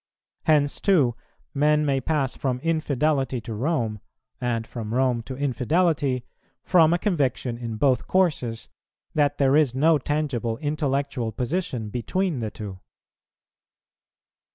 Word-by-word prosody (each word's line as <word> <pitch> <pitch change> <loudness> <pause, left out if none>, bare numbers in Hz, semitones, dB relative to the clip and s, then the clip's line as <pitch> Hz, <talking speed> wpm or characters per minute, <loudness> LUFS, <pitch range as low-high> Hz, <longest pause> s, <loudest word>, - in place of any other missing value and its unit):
Hence, 145 -2 +2
too, 155 - +3 0.4
men 150 +1 +3
may 135 -2 +1
pass 140 -2 0
from 130 -2 -1
infidelity 150 -4 0
to 115 0 -6
Rome, 115 -3 -1 0.4
and 120 -2 -1
from 115 -1 -5
Rome 125 -2 +2
to 130 +3 -7
infidelity, 140 -1 +1 0.4
from 165 -3 +5
a 175 - +3
conviction 140 - 0
in 115 -1 -5
both 130 -1 +2
courses 150 -11 0 0.5
that 145 -2 +2
there 135 0 +3
is 145 -5 +3
no 155 +3 +4
tangible 130 -6 -1
intellectual 140 -5 -1
position 125 - -2
between 150 - -1
the 110 -2 -2
two. 100 -2 -8
135 Hz, 125 wpm, -25 LUFS, 120-155 Hz, 0.5 s, from